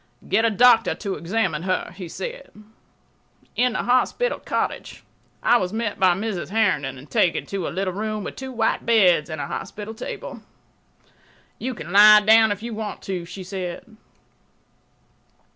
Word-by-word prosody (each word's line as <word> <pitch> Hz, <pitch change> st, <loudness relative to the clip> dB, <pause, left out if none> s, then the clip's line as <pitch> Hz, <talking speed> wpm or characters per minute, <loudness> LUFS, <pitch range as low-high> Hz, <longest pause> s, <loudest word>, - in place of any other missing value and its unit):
"Get 225 Hz, +3 st, +2 dB
a -, -, +4 dB
doctor 230 Hz, +1 st, +4 dB
to 200 Hz, -3 st, -4 dB
examine 180 Hz, -4 st, -1 dB
her," 185 Hz, 0 st, -2 dB
he 180 Hz, -2 st, -8 dB
said. -, -, -7 dB, 1.1 s
In 250 Hz, -1 st, +2 dB
the -, -, -2 dB
hospital 255 Hz, -, +1 dB
cottage -, -, -4 dB, 0.4 s
I 240 Hz, -, +5 dB
was 185 Hz, -4 st, -2 dB
met 220 Hz, -1 st, -3 dB
by 185 Hz, -2 st, +4 dB
Mrs. 200 Hz, -3 st, -4 dB
Herndon 165 Hz, -11 st, 0 dB
and 130 Hz, +4 st, -13 dB
taken 170 Hz, +5 st, +1 dB
to 195 Hz, -3 st, -4 dB
a -, -, -2 dB
little 185 Hz, 0 st, -2 dB
room 215 Hz, +1 st, -3 dB
with -, -, -7 dB
two 265 Hz, 0 st, -7 dB
white 225 Hz, -2 st, 0 dB
beds 185 Hz, -9 st, +3 dB
and 155 Hz, -2 st, -5 dB
a -, -, -3 dB
hospital 210 Hz, +1 st, -6 dB
table. 220 Hz, -, -7 dB, 1.2 s
"You 255 Hz, +1 st, -4 dB
can 175 Hz, -, -8 dB
lie 210 Hz, +1 st, +9 dB
down 220 Hz, +1 st, +5 dB
if 205 Hz, +1 st, -4 dB
you 235 Hz, -1 st, -5 dB
want 215 Hz, -1 st, -6 dB
to," 180 Hz, -3 st, -4 dB
she 190 Hz, +2 st, -9 dB
said. 185 Hz, +3 st, -7 dB
205 Hz, 160 wpm, -23 LUFS, 185-225 Hz, 1.2 s, lie